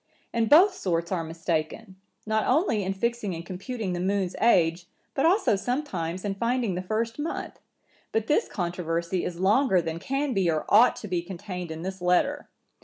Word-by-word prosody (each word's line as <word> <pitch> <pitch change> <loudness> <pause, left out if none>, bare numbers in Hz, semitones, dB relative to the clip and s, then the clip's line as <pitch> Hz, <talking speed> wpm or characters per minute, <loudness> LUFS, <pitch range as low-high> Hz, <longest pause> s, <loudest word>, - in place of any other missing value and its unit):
And 230 -2 +1
both 370 +6 +7
sorts 170 - -2
are 175 -3 0
mistaken, 165 +4 -3 0.3
not 220 0 0
only 260 - +2
in 190 0 -1
fixing 210 -1 -2
and 165 +1 -7
computing 195 +2 -4
the 175 - -3
moon's 190 0 -1
age, 175 -6 +3 0.3
but 275 - +2
also 370 - +3
sometimes 195 - -3
in 200 - -1
finding 235 0 0
the 180 - -3
first 225 +6 -2
month; 310 +3 -4 0.5
but 225 -1 0
this 295 - +2
controversy 170 -1 -2
is 175 -1 -4
longer 200 +2 +3
than 165 -1 -3
can 275 +5 -1
be 190 -5 +2
or 155 -2 0
ought 225 +4 +6
to 210 - -8
be 180 -3 -1
contained 180 0 -7
in 160 +1 -6
this 190 0 -5
letter. 180 0 +1
190 Hz, 180 wpm, -26 LUFS, 175-230 Hz, 0.5 s, both